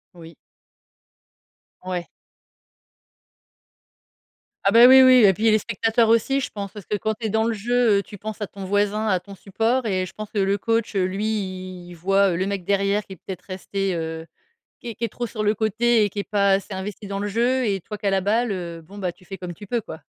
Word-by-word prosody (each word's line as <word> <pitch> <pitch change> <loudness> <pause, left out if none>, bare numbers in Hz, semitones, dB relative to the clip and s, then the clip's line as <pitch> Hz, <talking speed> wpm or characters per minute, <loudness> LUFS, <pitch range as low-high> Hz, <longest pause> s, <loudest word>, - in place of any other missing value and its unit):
Oui. 165 -2 -13 1.5
Ouais. 180 -2 -4 2.6
Ah 195 - +3
bah 235 +2 +8
oui, 265 +1 +9
oui 255 -2 +7
et 190 - +6
puis, 220 +4 +2
les 215 - +4
spectateurs 225 +1 +1
aussi, 230 +5 +3
je - - -3
pense. 200 -2 -6
Parce 210 -4 -10
que 210 - -1
quand 220 +2 -1
tu 225 0 -4
es - - -3
dans 220 +2 +1
le 230 0 0
jeu, 230 0 +2
heu, - - -4
tu 205 - -11
penses 215 +2 -7
à 205 - -2
ton 195 -1 -9
voisin, 205 +2 0
à 185 -4 +2
ton 200 +2 -12
support 225 +7 -1
et 185 -3 0
je 185 - -11
pense 215 -1 -8
que 210 - -2
le 195 +1 +2
coach, 225 +1 -1
lui, 195 +2 0 0.6
il 175 - -10
voit 195 +2 +2
le 185 - -1
mec 200 -3 -3
derrière 200 +1 +1
qui 190 - -10
est - - -10
peut-être 185 +2 -8
resté 195 0 -3
heu, 160 0 -4 0.5
qui 240 - -7
est 225 - -7
qui 235 - -7
est 230 - 0
trop 240 +4 -4
sur 215 -2 -4
le 210 +1 +2
côté 225 +1 +2
et 205 - +1
qui 205 - -6
est - - -1
pas 200 -1 +3
assez 195 +1 0
investi 200 +2 -6
dans 195 0 -4
le 205 - -2
jeu 245 +5 +1
et 195 -3 -1
toi 210 +4 -7
qui 205 - -10
a - - +3
la 195 - +2
balle, 220 +4 +1
heu, 170 -3 -5
bon, 195 +6 -12 0.2
tu 180 - -22
fais 195 - -8
comme 180 -2 -7
tu 205 - -12
peux, 235 +1 -1
quoi. 205 - -8
205 Hz, 235 wpm, -23 LUFS, 190-225 Hz, 2.6 s, oui